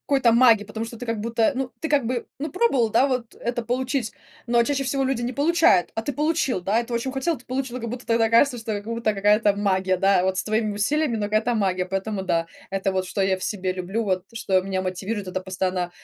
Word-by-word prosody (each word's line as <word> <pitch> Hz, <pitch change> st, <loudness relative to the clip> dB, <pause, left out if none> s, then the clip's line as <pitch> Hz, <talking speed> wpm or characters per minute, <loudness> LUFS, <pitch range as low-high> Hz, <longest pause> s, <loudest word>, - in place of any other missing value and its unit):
какой-то 270 Hz, -4 st, +2 dB
маги, 230 Hz, -3 st, +5 dB
потому 220 Hz, +2 st, -5 dB
что 235 Hz, -, -9 dB
ты 245 Hz, -, -7 dB
как 230 Hz, -2 st, -2 dB
будто, 225 Hz, +1 st, +1 dB
ну, 265 Hz, -1 st, -3 dB
ты 320 Hz, -, -2 dB
как 280 Hz, -5 st, +2 dB
бы, 245 Hz, -1 st, -3 dB
ну, 305 Hz, +3 st, -3 dB
пробовал, 275 Hz, -, +2 dB
да, 270 Hz, +5 st, +3 dB
вот 250 Hz, -3 st, -3 dB
это 240 Hz, 0 st, -3 dB
получить, 250 Hz, -1 st, -1 dB, 0.3 s
но 235 Hz, 0 st, +3 dB
чаще 275 Hz, +2 st, -1 dB
всего 270 Hz, +1 st, 0 dB
люди 265 Hz, -2 st, 0 dB
не 245 Hz, +2 st, -2 dB
получают, 290 Hz, -, +3 dB
а 225 Hz, -, -1 dB
ты 285 Hz, -, -3 dB
получил, 300 Hz, -, 0 dB
да, 200 Hz, +5 st, +1 dB
и 235 Hz, -, 0 dB
ты 235 Hz, -, -5 dB
очень 235 Hz, +3 st, -1 dB
хотел, 270 Hz, +5 st, -1 dB
ты 250 Hz, -, -17 dB
получил. 255 Hz, -1 st, -3 dB
Как 235 Hz, -, -4 dB
будто 250 Hz, 0 st, -7 dB
тогда 230 Hz, -1 st, +2 dB
кажется, 245 Hz, +2 st, +4 dB
что 225 Hz, -1 st, -6 dB
это 205 Hz, -1 st, -2 dB
как 230 Hz, -, -4 dB
будто 230 Hz, -2 st, 0 dB
какая-то 205 Hz, +1 st, +3 dB
магия, 190 Hz, -2 st, +1 dB
да, 195 Hz, -1 st, +3 dB
вот 185 Hz, 0 st, 0 dB
с -, -, -1 dB
твоими 215 Hz, -1 st, 0 dB
усилиями, 275 Hz, +4 st, 0 dB
но 210 Hz, -, -2 dB
какая-то 215 Hz, +3 st, +1 dB
магия. 185 Hz, -3 st, 0 dB
Поэтому 195 Hz, +1 st, -3 dB
да, 165 Hz, -2 st, 0 dB, 0.2 s
это 195 Hz, 0 st, -1 dB
вот 185 Hz, 0 st, 0 dB
что 190 Hz, +2 st, -4 dB
я 190 Hz, -1 st, +2 dB
в 185 Hz, -, -11 dB
себе 185 Hz, -3 st, -2 dB
люблю, 190 Hz, +5 st, -3 dB
вот 185 Hz, -2 st, -1 dB
что 195 Hz, -4 st, +1 dB
меня 190 Hz, 0 st, -2 dB
мотивирует, 190 Hz, +3 st, -3 dB
это 185 Hz, +1 st, -3 dB
постоянно, 185 Hz, -1 st, -2 dB
225 Hz, 245 wpm, -24 LUFS, 195-250 Hz, 0.3 s, маги